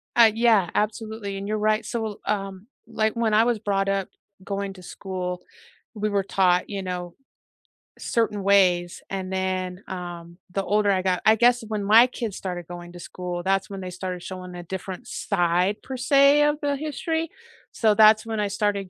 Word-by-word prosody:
Ah, 230 -2 +7
yeah, 220 -6 +3
absolutely, 215 -1 -2
and 200 +1 -5
you're 215 0 -1
right, 215 +1 +1
so, 230 -2 -3
l 210 -2 -6
um, 195 0 -3 0.2
like, 220 -1 0
when 225 -2 0
I 220 +2 +6
was 235 -2 +1
brought 195 -2 0
up 195 -1 0 0.4
going 200 0 -4
to 185 -1 -14
school, 180 -2 -5 0.5
we 215 -1 -2
were 200 -1 +1
taught, 180 -2 +2
you 200 -1 -4
know, 180 -1 -5 0.8
certain 210 -4 -1
ways, 180 -3 +3
and 190 -1 -4
then, 185 0 -2
um, 175 -2 -7 0.2
the 195 - -1
older 205 0 +2
I 185 -1 +1
got 185 -1 0
I 220 +1 +7
guess 240 +1 +3
when 210 -2 -3
my 225 +5 +7
kids 230 -5 -5
started 180 -3 -5
going 175 0 -9
to 175 - -10
school, 175 +1 -5
that's 195 +1 0
when 195 -1 -6
they 185 - -5
started 180 0 -5
showing 185 -1 -7
a 175 - -7
different 190 +6 -7
side, 180 +1 0
per 265 - -6
se, 280 +3 +5
of 295 0 +3
the 285 -1 0
history, 315 +2 -3 0.4
so 220 -2 +2
that's 215 +1 +6
when 220 -1 -3
I 205 - 0
started 200 -1 -1
200 Hz, 185 wpm, -24 LUFS, 185-220 Hz, 0.8 s, Ah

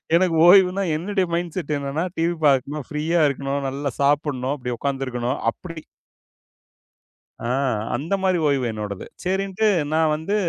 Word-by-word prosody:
எனக்கு 175 -2 +3
ஓய்வுன்னா, 190 +1 +6
என்னுடைய 190 +3 -1
மைண்ட்செட் 170 -2 -2
என்னன்னா 140 +4 -2
டிவி 170 +1 +1
பாக்கணும், 140 +1 +1
ஃப்ரீயா 160 +3 0
இருக்கணும், 140 +1 -2
நல்லா 140 0 -3
சாப்புடணும், 140 -2 +1
அப்படி 125 -3 -5
உக்காந்து 135 -1 -2
இருக்கணும், 125 +1 -2
அப்படி. 165 -3 -9 1.7
ஆ - - -2 0.5
அந்த 155 +10 -3
மாதிரி 185 -2 +2
ஓய்வு 135 -3 +1
என்னோடது. 105 -3 -5 0.2
சரின்னுட்டு, 195 +3 0 0.3
நா 160 - +2 0.2
வந்து 160 +7 -2
150 Hz, 130 wpm, -22 LUFS, 135-180 Hz, 1.7 s, ஓய்வுன்னா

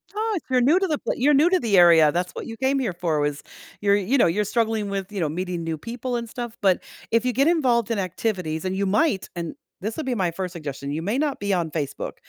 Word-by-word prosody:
Ah, 440 +1 -1
if 345 - -4
you're 255 -1 +3
new 300 +9 +4
to 385 - 0
the 305 -4 0
pl - - -2
you're 285 +4 +3
new 295 +5 +5
to 370 0 +3
the 215 - +2
area, 165 -4 +7
that's 175 +3 -2
what - - -7
you 225 -1 -7
came 265 +1 +1
here 230 -8 -1
for 170 -3 -1
was 145 0 -1 0.4
you're, 200 0 +4
you 205 +7 +1
know, - - +5
you're 195 +6 +1
struggling 220 -1 0
with, 195 0 -4
you 205 - -4
know, 160 -4 0
meeting 175 +1 -3
new 165 -1 -3
people 245 +6 -4
and 235 -1 -3
stuff, 240 0 -6
but 190 -3 +3 0.3
if 230 +1 +2
you 250 - +1
get 275 +4 +3
involved 250 -9 +2
in 225 - 0
activities, 180 -3 -2
and 185 0 -1
you 200 +1 0
might 205 - +1
and 170 -2 -5 0.3
this 215 +3 -3
would 315 - -4
be 260 - 0
my 185 -5 +1
first 180 +1 -4
suggestion, 140 -4 -6
you 155 +2 -2
may 210 +9 -1
not 295 -1 -1
be 200 -1 -1
on 170 -3 -1
Facebook, 150 -4 -4
205 Hz, 270 wpm, -24 LUFS, 175-250 Hz, 0.4 s, area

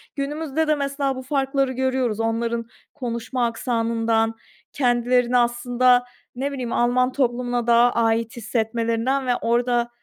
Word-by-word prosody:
günümüzde 300 +2 -2
de, 305 - +3
mesela, 275 -1 -2
bu 260 - -6
farkları 270 0 0
görüyoruz 260 -4 -1
onların 230 +1 -1 0.3
konuşma 245 -1 -3
aksanından, 230 -1 0 0.4
kendilerini 245 -1 +2
aslında, 245 +1 +3 0.3
ne 275 +3 -2
bileyim, 255 -4 -4
Alman 250 +1 +2
toplumuna 245 -2 -1
daha 235 +1 +5
ait 230 0 0
hissetmelerinden 230 +3 -1
ve 245 - +2
orada, 240 +1 +1
245 Hz, 120 wpm, -22 LUFS, 235-260 Hz, 0.4 s, daha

